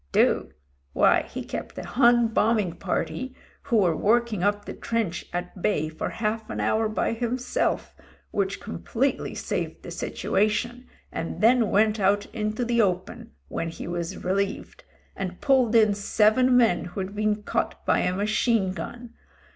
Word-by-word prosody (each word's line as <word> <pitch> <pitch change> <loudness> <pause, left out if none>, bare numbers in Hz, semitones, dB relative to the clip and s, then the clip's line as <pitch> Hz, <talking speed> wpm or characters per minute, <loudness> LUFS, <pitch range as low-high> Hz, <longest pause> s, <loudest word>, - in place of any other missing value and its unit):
"Do? - - +3 0.4
Why - - +4
he - - -5
kept - - -6
a - - -5
Hun 240 -2 +4
bombing 215 -5 +2
party 260 +7 -3 0.3
who 235 - +2
were 180 -6 +3
working 225 +1 +1
up 205 +1 +1
the - - -6
trench 225 -7 -2
at 180 +1 -5
bay 155 -7 +1
for 155 - -4
half 220 0 -3
an - - -4
hour 220 0 +1
by 215 - 0
him 240 +2 -1
self, 250 - -1 0.4
which 200 -1 -1
completely 245 +4 -2
saved - - -3
the - - -8
situation, 240 +4 -1 0.2
and 165 - -4
then 230 0 +4
went 215 +2 +3
out 200 +1 +2
into 215 +1 -2
the 235 0 +2
open, 205 +4 -2
when 165 - -3
he 165 - -7
was 175 +1 -4
relieved, 195 +2 -2 0.3
and 185 -2 -5
pulled 255 -4 +3
in 215 -2 +6
seven 220 +5 +3
men 225 -8 +3
who'd 190 +3 -5
been 210 0 0
caught - - -2
by - - +3
a 180 - 0
machine 210 -1 +1
gun. 235 +7 -7
215 Hz, 155 wpm, -25 LUFS, 190-235 Hz, 0.4 s, in